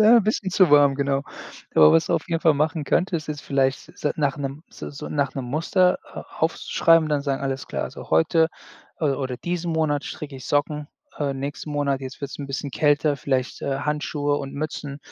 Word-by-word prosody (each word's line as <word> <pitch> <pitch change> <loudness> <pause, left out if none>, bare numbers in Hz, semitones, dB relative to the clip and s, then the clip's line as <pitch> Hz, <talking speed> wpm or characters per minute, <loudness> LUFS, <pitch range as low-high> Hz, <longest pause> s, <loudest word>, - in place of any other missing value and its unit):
'n 225 +2 +7
bisschen 205 -2 -1
zu 185 -2 +4
warm, 145 -1 +6
genau. 140 0 0 0.5
Aber 75 -1 +8
was 165 - +4
du - - +1
auf - - -2
jeden 165 -1 0
Fall 160 -2 +4
machen 155 +1 0
könntest, 170 -1 0
ist 150 -1 -4
vielleicht 135 0 0
s - - -17
s 150 - +2
nach 145 -2 +1
'nem 140 +2 -4
so - - -8
so 140 - -7
nach 140 -2 -1
'nem 135 - -3
Muster 170 +7 +2
a - - -9 0.2
aufzuschreiben, 165 0 +3
dann 150 -1 +1
sagen: 140 -1 -2
„Alles 135 -1 -3
klar, - - -3 0.2
heute, 160 - +4 0.5
äh, - - 0
oder 135 -2 -1
diesen 175 +3 -3
Monat 155 -3 +1
stricke 145 -4 -7
ich 130 - -9
Socken, 150 0 0 0.3
äh, 140 -2 -1
nächsten 140 +3 -5
Monat, 140 -2 0
jetzt 130 -1 -8
wird's 140 - -5
'n 140 - -5
bisschen 140 +1 -4
kälter, 145 +1 +2
vielleicht, 130 -2 -1
äh, 135 0 -2
Handschuhe 150 -1 -1
und 135 -1 -6
Mützen, 145 -1 -4
145 Hz, 205 wpm, -24 LUFS, 135-155 Hz, 0.5 s, Aber